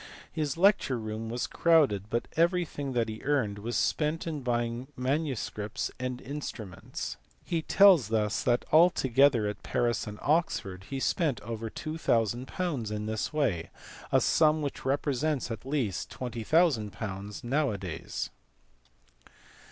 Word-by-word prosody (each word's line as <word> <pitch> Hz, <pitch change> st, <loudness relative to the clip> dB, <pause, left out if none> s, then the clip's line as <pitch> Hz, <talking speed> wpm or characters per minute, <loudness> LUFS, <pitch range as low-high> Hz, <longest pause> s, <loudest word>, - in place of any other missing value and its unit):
His 155 Hz, -2 st, -2 dB
lecture 185 Hz, -8 st, +4 dB
room 110 Hz, 0 st, -5 dB
was 120 Hz, +1 st, -2 dB
crowded 140 Hz, -, +3 dB
but 120 Hz, +2 st, -1 dB
everything 165 Hz, -5 st, +1 dB
that 120 Hz, -2 st, +1 dB
he 110 Hz, 0 st, -6 dB
earned 130 Hz, -8 st, 0 dB
was 115 Hz, +4 st, -4 dB
spent 155 Hz, +1 st, 0 dB
in. 155 Hz, -4 st, -3 dB
buying 120 Hz, 0 st, -1 dB
manuscripts 125 Hz, -6 st, -2 dB
and 125 Hz, 0 st, -3 dB
instruments. 125 Hz, -9 st, -6 dB, 0.3 s
He 170 Hz, -2 st, -1 dB
tells 175 Hz, -, +6 dB
us 105 Hz, -1 st, +1 dB
that 120 Hz, -, +1 dB
altogether 135 Hz, -7 st, +5 dB
at 105 Hz, 0 st, -3 dB
Paris 120 Hz, -3 st, 0 dB
and 105 Hz, 0 st, -6 dB
Oxford 100 Hz, -, 0 dB
he 135 Hz, -, -3 dB
spent 145 Hz, -, +1 dB
over 115 Hz, +1 st, -5 dB
2000 120 Hz, -5 st, -1 dB, 0.4 s
in 105 Hz, 0 st, -3 dB
this 110 Hz, 0 st, -2 dB
way 120 Hz, -, 0 dB, 0.4 s
a -, -, +5 dB
sum 155 Hz, -1 st, +3 dB
which 140 Hz, -, -4 dB
represents 140 Hz, 0 st, 0 dB
at 115 Hz, +3 st, -6 dB
least 130 Hz, -10 st, -1 dB
.20,000 110 Hz, -, -1 dB
now 140 Hz, +4 st, +1 dB
a 105 Hz, -, -2 dB
days. 85 Hz, -4 st, -5 dB
125 Hz, 130 wpm, -29 LUFS, 110-150 Hz, 0.4 s, tells